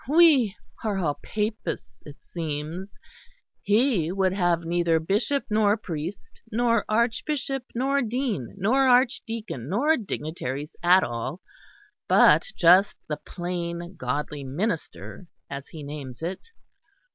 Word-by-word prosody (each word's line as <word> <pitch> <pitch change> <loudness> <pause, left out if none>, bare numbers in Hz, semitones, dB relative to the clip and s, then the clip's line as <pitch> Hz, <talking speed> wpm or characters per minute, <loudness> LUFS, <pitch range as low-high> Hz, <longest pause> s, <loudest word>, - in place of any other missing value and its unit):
We 290 - +5 0.3
are 210 -3 0
all 150 -6 -1
Papists, 215 +1 -4
it 145 - -10
seems! 165 +3 -5 0.6
He 210 - +2
would 190 -1 +1
have 175 -3 +2
neither 170 -1 +2
bishop 210 - 0
nor 215 -1 +3
priest 170 -2 -6
nor 230 0 +2
archbishop 250 +4 0
nor 275 +3 +1
dean 235 - -2
nor 255 +8 +3
archdeacon, 230 - +1
nor 285 - +3
dignitaries 150 - -5
at 180 +2 +6
all, 120 +7 -4 0.7
but - - +6
just 180 +4 +5
the 150 - -1
plain 175 0 -5
Godly 145 +3 -3
Minister, 145 - -4 0.2
as 140 0 -6
he 155 -2 -9
names 140 -2 -7
it. 185 - -4
185 Hz, 115 wpm, -26 LUFS, 155-230 Hz, 0.7 s, at